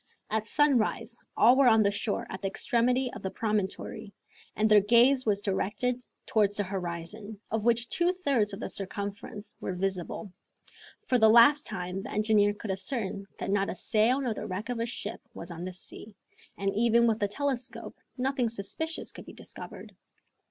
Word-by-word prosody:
At 220 0 0
sunrise 280 -7 +1 0.2
all 245 - +7
were 270 -1 +5
on 220 -2 +6
the 200 - +3
shore 205 +1 -2
at 190 - -6
the 195 - -1
extremity 245 +5 +1
of - - -8
the 190 - -3
promontory, 210 0 -3 0.4
and 215 - +2
their 215 -1 +7
gaze 240 +5 +4
was 205 -1 +1
directed 220 +6 -1 0.2
towards 205 -2 +2
the 205 - +1
horizon, 190 +3 -6
of 220 0 -1
which 235 0 +2
two 345 +5 +2
thirds 275 - +1
of 195 - -7
the - - -3
circumference 200 +1 -5
were 185 - -3
visible. 190 +1 -3 0.7
For 250 - +2
the 220 -1 +7
last 240 +7 +6
time 180 +1 -4
the - - -8
engineer 210 -1 +3
could 210 -1 -5
ascertain 195 0 -3
that - - -3
not 200 -1 +1
a - - -3
sail 225 +7 +2
nor 250 -5 -1
the - - -6
wreck 200 +4 -5
of 245 -2 -2
a 230 - -1
ship 240 - -3
was - - -7
on 170 +1 -6
the 185 - -4
sea, 200 +3 -9 0.4
and 195 0 -1
even 235 +2 +4
with 225 -1 +2
the 205 - +1
telescope 260 +2 -3 0.2
nothing 255 -2 0
suspicious 320 - -2
could - - -12
be - - -10
discovered. - - -10
215 Hz, 180 wpm, -29 LUFS, 200-240 Hz, 0.7 s, all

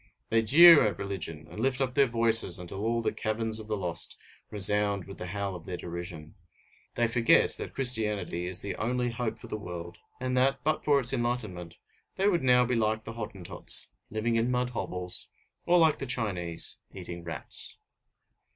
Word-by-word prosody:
They 115 0 +3
jeer 165 +7 +8
at 100 -4 -3
religion, 85 -5 -5
and - - -10
lift 130 +2 0
up 130 -2 -1
their 140 0 +4
voices 115 -5 +2
until 90 +2 -7
all 115 +1 0
the - - 0
caverns 110 0 -1
of 110 - -9
the 105 -1 -2
lost 85 -3 -1 0.3
resound 105 -1 +2
with 95 - -11
the 90 - -6
howl 100 +1 -4
of 85 0 -11
their 90 -1 -4
derision. 85 -3 -7 0.6
They 120 - +2
forget 115 0 +3
that - - -7
Christianity 105 -8 +1
is 90 0 -2
the 100 - -4
only 125 +1 -1
hope 115 -1 -3
for - - -8
the 110 - -5
world, 85 -2 -8 0.2
and 130 0 -2
that, 135 +2 +1
but 155 +1 0
for 145 -2 +3
its 125 0 +5
enlightenment, 110 -9 -3 0.4
they 195 - +1
would 175 -6 +2
now 125 -1 +4
be 125 - -1
like 110 -1 0
the 115 - -8
Hottentots, 105 -6 0 0.2
living 115 +2 -1
in 115 +2 +1
mud 125 0 -1
hovels, 90 -6 -3 0.4
or 180 - +5
like 160 -3 +3
the 135 - -5
Chinese, 95 -9 -2
eating 85 -1 -8
rats. 85 - -5
110 Hz, 185 wpm, -28 LUFS, 90-125 Hz, 0.6 s, jeer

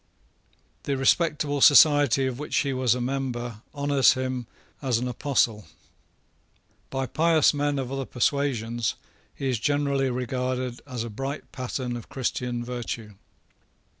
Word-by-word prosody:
The 140 -1 -1
respectable 145 0 +1
society 145 -3 +6
of 130 -1 -3
which 150 - -4
he 140 -2 +1
was 130 -2 +2
a - - -3
member 120 -3 -3
honours 140 -1 +4
him 130 -2 -3 0.3
as 130 -5 +1
an 125 +2 -2
apostle. 120 - 0 1.2
By 135 0 -2
pious 160 +4 +3
men 145 0 0
of 130 -1 -3
other 135 -1 -3
persuasions 120 -4 0 0.4
he 135 - -3
is 125 -4 0
generally 140 +1 +1
regarded 125 0 -2
as 125 -4 -4
a 115 - -6
bright 135 +6 -5
pattern 130 -1 -4
of 120 - -8
Christian 125 -2 -3
virtue. 120 -3 -5
130 Hz, 135 wpm, -26 LUFS, 120-140 Hz, 1.2 s, society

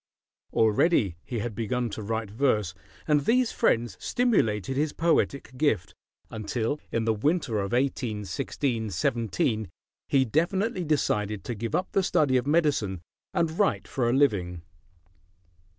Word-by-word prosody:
Already 110 - +3
he 120 - -5
had 110 +1 -3
begun 115 +2 -2
to 105 - -5
write 110 0 -3
verse, 105 -6 +1 0.3
and 150 -2 +4
these 250 0 +3
friends 115 -4 +1
stimulated 130 - +1
his 150 +2 0
poetic 140 -6 0
gift, 125 - +1 0.4
until 110 +6 -2
in 115 -1 0
the 110 - +3
winter 130 0 0
of 100 -1 -2
1816 115 -1 -1
17 115 - 0 0.4
he 135 -1 +4
definitely 185 - 0
decided 105 -9 0
to 120 - -4
give 115 0 -3
up 185 - -1
the 195 - +2
study 145 -7 +2
of 125 +2 -1
medicine 145 - +1 0.3
and 165 +1 -1
write 105 - +1
for 120 -3 0
a - - +2
living. 95 - +1
120 Hz, 135 wpm, -27 LUFS, 105-150 Hz, 0.4 s, and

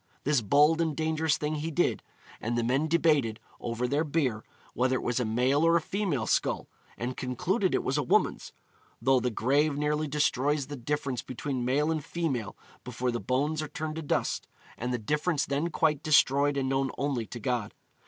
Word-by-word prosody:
This 145 -3 +2
bold 150 +9 +4
and 160 -3 -1
dangerous 160 -1 +1
thing 150 +1 -2
he 155 +2 -3
did, 170 +2 +1 0.4
and 120 +2 -1
the 120 - +1
men 135 +6 +1
debated, 150 -9 +2 0.2
over 120 +1 -2
their 145 +5 +1
beer, 140 -8 -1 0.3
whether 130 +1 +1
it - - -2
was 120 +1 0
a 125 - 0
male 125 +7 +2
or 165 0 +5
a - - +2
female 170 - -1
skull, - - 0 0.3
and 125 +2 -3
concluded 180 - 0
it - - 0
was 135 +3 0
a - - +2
woman's, 130 - +1 0.5
'though 130 +2 +3
the 125 +1 0
grave 140 +6 +1
nearly 150 +1 0
destroys 145 0 +1
the 145 +2 -7
difference 135 0 -2
between 130 0 -4
male 145 +5 +1
and 155 -2 -2
female 140 - -3 0.3
before 125 0 -2
the 120 - -2
bones 140 +8 0
are 155 - -4
turned 155 +1 -5
to - - -3
dust, 150 - -1 0.3
and 125 +2 -3
the 125 - 0
difference 150 +6 0
then 145 +5 -1
quite 155 -3 +1
destroyed 145 -2 +4
and 135 -1 0
known 135 0 +1
only 135 -6 -1
to 120 - -7
God.' 115 -1 -2
140 Hz, 190 wpm, -29 LUFS, 125-155 Hz, 0.5 s, or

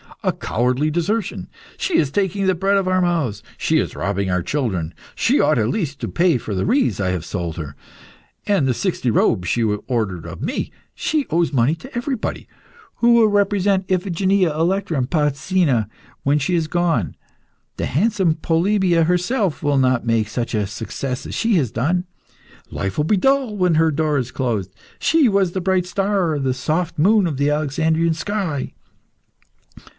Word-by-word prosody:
"A - - +2
cowardly 125 +6 0
desertion!" 185 +7 -2 0.3
"She 370 - 0
is 140 -3 +1
taking 195 +2 0
the 190 - +3
bread 195 +3 +1
out 195 - +3
of 185 - -5
our 185 0 +2
mouths." 160 - 0 0.2
"She - - +1
is - - -3
robbing 100 +1 -1
our 90 -1 0
children." 95 - -2 0.2
"She - - +2
ought - - +3
at 110 -1 +1
least 150 - -2
to - - -3
pay 170 -4 +2
for 110 -2 -5
the 95 - -1
wreaths 255 - +1
I 95 -2 0
have 90 -3 -2
sold 85 -5 -4
to - - -4
her." 75 -2 -8 0.7
"And 195 -10 +2
the 130 - +2
sixty 175 -8 -1
robes 100 -4 +2
she 120 - +1
has 105 -2 0
ordered 100 -9 -2
of 90 0 -8
me." - - -3 0.2
"She 300 -3 -1
owes 165 -1 +1
money 130 +3 +3
to 255 +11 -13
everybody." 245 -1 -3 0.5
"Who 235 0 +4
will 230 -2 +5
represent 200 -2 +1
Iphigenia, 185 0 +1
Electra, 170 +1 0
and 125 -1 -1
Polyxena 150 - +1 0.3
when 140 +2 +2
she 150 +5 0
is 165 -2 0
gone? 165 - 0 0.6
The - - -2
handsome 185 - +1
Polybia 170 +1 +2
herself 180 - 0
will 145 -1 +2
not 130 -2 +2
make 115 -2 +1
such 115 +2 -3
a 105 -3 0
success 125 +6 -5
as - - -7
she 225 -2 +1
has 135 - +1
done." 175 +10 0 0.6
"Life 95 0 -4
will 150 - +1
be 205 +5 +2
dull 270 0 +2
when 180 -3 +2
her 160 +1 +4
door 150 0 0
is 125 0 -4
closed." 115 -8 -2 0.3
"She 320 -5 +3
was 195 -4 +2
the 190 - -3
bright 185 -1 +1
star, 190 -3 0
the 135 -2 0
soft 160 +6 -2
moon 205 +4 +4
of 155 -6 -2
the 140 +1 +2
Alexandrian 160 +2 +1
sky." 170 -5 -3
160 Hz, 180 wpm, -20 LUFS, 125-190 Hz, 0.7 s, will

